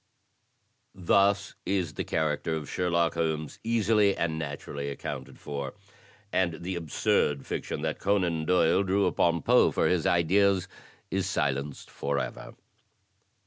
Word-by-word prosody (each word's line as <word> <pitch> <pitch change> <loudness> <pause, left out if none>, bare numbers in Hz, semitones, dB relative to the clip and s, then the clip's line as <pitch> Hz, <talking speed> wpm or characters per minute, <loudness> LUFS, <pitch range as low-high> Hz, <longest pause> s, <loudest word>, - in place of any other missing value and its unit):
Thus 100 +2 +2
is 90 -5 -1
the - - -3
character 80 0 -1
of 75 -3 -5
Sherlock 85 0 +1
Holmes 80 -2 -2
easily 110 -3 +2
and 80 -2 -1
naturally 70 -1 -5
accoimted 70 - -6
for, 70 -2 -5 0.6
and 85 -3 0
the 95 +1 -3
absurd 75 -3 0
fiction 75 - -4
that 80 -1 -2
Conan 90 -6 +1
Doyle 90 +1 +3
drew 100 +1 +2
upon 85 -2 +1
Poe - - +5
for - - +1
his 90 -4 +1
ideas 95 +2 +3 0.4
is 95 -1 0
silenced 70 -4 -2
forever." 70 0 -3
85 Hz, 125 wpm, -28 LUFS, 75-95 Hz, 0.6 s, Poe